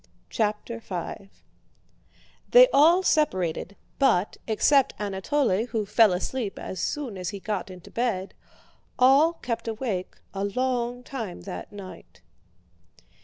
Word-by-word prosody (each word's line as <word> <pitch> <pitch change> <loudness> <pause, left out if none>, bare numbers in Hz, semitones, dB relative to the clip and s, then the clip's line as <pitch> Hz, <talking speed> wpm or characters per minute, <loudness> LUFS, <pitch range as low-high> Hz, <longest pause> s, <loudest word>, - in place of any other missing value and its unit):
CHAPTER 215 +2 -2
V 195 -1 -6 1.2
They - - +8
all 335 +6 +6
separated, 190 - 0 0.2
but, 210 -9 +2
except 270 +5 +3
Anatole 210 +2 0
who 220 -4 -2
fell 215 0 +5
asleep 200 +4 -3
as 185 - -6
soon 250 -7 -3
as 180 - -3
he 200 - -6
got 210 0 -3
into 185 -1 -12
bed, 220 -6 -2 0.6
all 275 +6 +5
kept 235 -8 -5
awake 220 -5 -3 0.2
a 195 0 -3
long 245 +3 -1
time 225 -9 -6
that 195 - -7
night. 200 -2 -12
220 Hz, 120 wpm, -26 LUFS, 195-260 Hz, 1.2 s, They